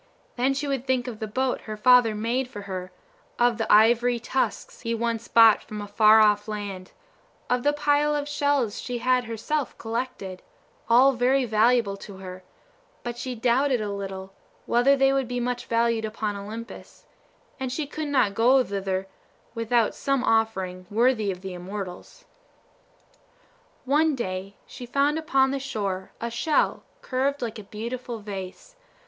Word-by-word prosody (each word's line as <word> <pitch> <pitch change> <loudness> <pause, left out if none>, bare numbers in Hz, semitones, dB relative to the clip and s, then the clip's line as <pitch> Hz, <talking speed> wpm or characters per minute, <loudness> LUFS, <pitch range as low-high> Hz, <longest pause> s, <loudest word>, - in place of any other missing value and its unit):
Then 260 +2 +1
she 285 +1 -2
would 270 -2 -2
think 255 -1 +1
of 225 -3 -6
the 220 - -4
boat 260 +4 -1
her 215 - -4
father 245 -1 +5
made 235 +4 -1
for 205 -5 -8
her 185 -2 -6 0.5
of 240 -1 +2
the 225 - 0
ivory 235 +3 +5
tusks 265 - -2
he 230 -1 -2
once 230 0 -2
brought 225 -2 +6
from 215 - -8
a 205 - -5
far 215 +1 +6
off 210 0 +3
land; 200 -3 -6 0.6
of 250 0 +2
the 290 - +3
pile 295 0 +2
of 290 0 -2
shells 285 -6 0
she 245 -1 -4
had 250 +1 +1
herself 235 +6 -3
collected, 225 -5 -5 0.5
all 255 +4 +6
very 255 +2 +2
valuable 220 -2 +2
to 200 -1 -11
her, 185 -1 -9 0.6
but 240 -1 -4
she 250 +1 -5
doubted 250 +3 +2
a 210 -1 -3
little 195 -1 -6 0.3
whether 260 +4 +3
they 270 0 +4
would 270 -2 0
be 245 0 -3
much 245 0 -3
valued 230 -1 +1
upon 215 -1 -3
Olympus, 220 +4 -9 0.5
and 260 -1 -3
she 300 +4 -2
could 310 +1 -5
not 260 -8 +2
go 250 +5 +4
thither 195 -3 -3 0.5
without 230 -1 +1
some 275 -2 -1
offering 190 -6 0
worthy 225 -1 +2
of 180 -1 -4
the 190 -1 -6
immortals. 190 - -8 1.6
One 300 +3 +3
day 190 -4 -5
she 245 - -10
found 285 +4 +1
upon 270 -4 +2
the 275 - -2
shore 200 -8 -3
a 235 0 -4
shell 295 +6 +1 0.2
curved 275 +1 -1
like 225 -1 -4
a - - -9
beautiful 235 +4 -6
vase. 205 - -8
235 Hz, 160 wpm, -25 LUFS, 210-260 Hz, 1.6 s, brought